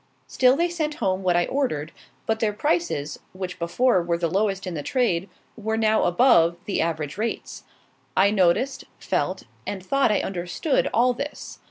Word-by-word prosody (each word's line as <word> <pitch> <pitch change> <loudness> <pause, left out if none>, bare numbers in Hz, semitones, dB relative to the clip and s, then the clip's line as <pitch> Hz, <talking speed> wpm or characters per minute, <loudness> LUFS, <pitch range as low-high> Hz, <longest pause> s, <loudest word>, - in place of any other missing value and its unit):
Still 255 0 +3
they 340 +2 +2
sent 315 -3 -2
home 190 -5 -1
what 180 -2 +2
I 175 0 +3
ordered; 170 - -2 0.3
but 220 0 0
their 215 -2 +1
prices, 215 - -1
which 185 -1 -6
before 185 +5 +2
were 170 0 -1
the 170 -1 -1
lowest 195 0 0
in 185 - -4
the 155 - -3
trade, 195 - 0 0.3
were 220 0 -2
now 220 -1 +3
above 175 -4 +4
the 205 - -1
average 160 +1 -2
rates. 230 +1 -4 0.5
I 200 - +5
noticed, 205 +7 +1
felt, - - -2 0.2
and 190 -2 -5
thought 275 0 +2
I 210 - +2
understood 185 - -1
all 245 +2 +3
this. 280 +5 -7
200 Hz, 170 wpm, -24 LUFS, 175-250 Hz, 0.5 s, I